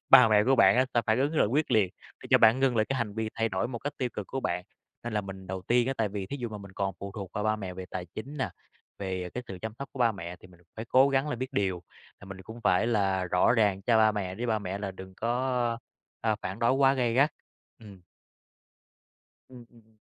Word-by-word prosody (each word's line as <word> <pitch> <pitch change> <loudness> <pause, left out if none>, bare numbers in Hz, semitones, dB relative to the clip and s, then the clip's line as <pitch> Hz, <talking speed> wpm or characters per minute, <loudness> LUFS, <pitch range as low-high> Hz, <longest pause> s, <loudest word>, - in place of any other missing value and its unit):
ba 125 -3 +9
mẹ 105 -1 +4
của 135 +1 +3
bạn 115 - +6
á 130 0 +4
sẽ 120 - +3
phản 110 +2 +2
ứng 145 +4 0
là - - +5
quyết 145 +8 0
liệt 100 -5 +2 0.3
để - - -10
cho - - +7
bạn 115 +4 +5
ngưng 130 -3 +2
lại 110 - +3
cái 135 - -1
hành 105 -3 -3
vi 110 -1 -2
thay 115 0 0
đổi 95 +3 -1
một 120 -3 -5
cách 145 +4 -4
tiêu 125 -2 0
cực 105 - -5
của 135 - -4
bạn. 90 -4 -2 0.4
Nên 120 - -4
là 105 - +1
mình 95 -1 -9
đầu 95 0 -5
tiên 120 +4 +2
á 135 - +1
tại 110 -2 +1
vì 100 -1 -5
thí 140 - -5
dụ 120 -3 -4
mà 105 -1 -7
mình 100 -1 -11
còn 95 0 -2
phụ 100 0 -6
thuộc 100 -3 -7
vào 105 - -3
ba 110 0 +2
mẹ 95 -3 -6
về 95 0 -6
tài 90 -1 -5
chính 135 - -8
nè, 130 - -2 0.5
về 95 -2 -4
cái 125 - -3
sự 95 - -7
chăm 110 - -4
sóc 140 - -6
của 135 - -10
ba 115 -2 +3
mẹ 90 -2 -7
thì 90 - -16
mình 90 -1 -20 0.2
phải 110 - -5
cố 130 +4 +5
gắng 135 +2 +1
là 120 - -2
biết 130 +3 -5
điều. 95 -6 -1 0.4
À, - - -13
mình 95 -1 -9
cũng 110 +5 -10
phải 100 0 +3
là 95 -5 +1
rõ 90 +5 +3
ràng 105 -5 +2
cho 115 +2 +3
ba 110 -1 +5
mẹ 95 -3 -3
để 120 +3 -4
ba 110 -2 +1
mẹ 95 -1 -4
là 100 -1 -4
đừng 95 0 -11
có, 120 +1 0 0.4
a, 110 -2 +1
phản 95 +3 -4
đối 115 +1 +3
quá 135 0 +4
gay 120 -3 +1
gắt, 140 +4 +4 0.5
ừm. 100 -4 -13 1.5
Ừm, 125 -2 -12
ùm. 110 -2 -23
110 Hz, 270 wpm, -28 LUFS, 95-125 Hz, 1.5 s, ba